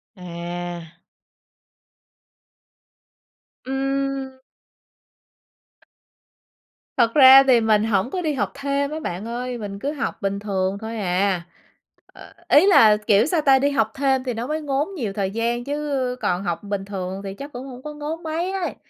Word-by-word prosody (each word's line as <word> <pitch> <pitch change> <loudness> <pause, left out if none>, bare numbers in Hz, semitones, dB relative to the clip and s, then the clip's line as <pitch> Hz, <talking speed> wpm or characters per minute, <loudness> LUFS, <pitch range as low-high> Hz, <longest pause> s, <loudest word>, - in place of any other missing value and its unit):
À! 175 -1 -7 2.7
Ừm. 270 0 -2 2.6
Thật 230 -2 +3
ra 270 -1 +9
thì 255 -3 +4
mình 215 -1 +3
hổng 215 0 +1
có 370 - -2
đi 310 -3 -1
học 210 -8 -2
thêm 280 0 -2
á 310 - -4
bạn 185 - -5
ơi, 245 +1 -4
mình 200 -3 -6
cứ 280 +7 -2
học 275 -5 -4
bình 200 0 -2
thường 195 -1 -2
thôi 225 +1 -5
à. 190 -1 0 0.7
Ờ, - - -15 0.2
ý 300 +6 +6
là, 220 - +6
kiểu 210 +1 +3
sao 320 +2 +1
ta, 270 -2 +5
đi 280 +2 +2
học 225 -6 +1
thêm 270 -1 +1
thì 255 -2 -3
nó 230 +2 -4
mới 310 +2 -2
ngốn 285 +2 -1
nhiều 225 - -3
thời 195 -1 -2
gian 235 +2 -1
chứ 280 -2 -2
còn 190 -3 -1
học 175 -1 -3
bình 200 -1 -4
thường 190 -1 -5
thì 195 -1 -5
chắc 280 +8 -9
cũng 250 +2 -7
hổng 255 -1 -10
có 300 - -6
ngốn 300 +3 -6
mấy 330 +3 -2
ấy. 385 -2 -3
245 Hz, 160 wpm, -22 LUFS, 200-280 Hz, 2.7 s, ra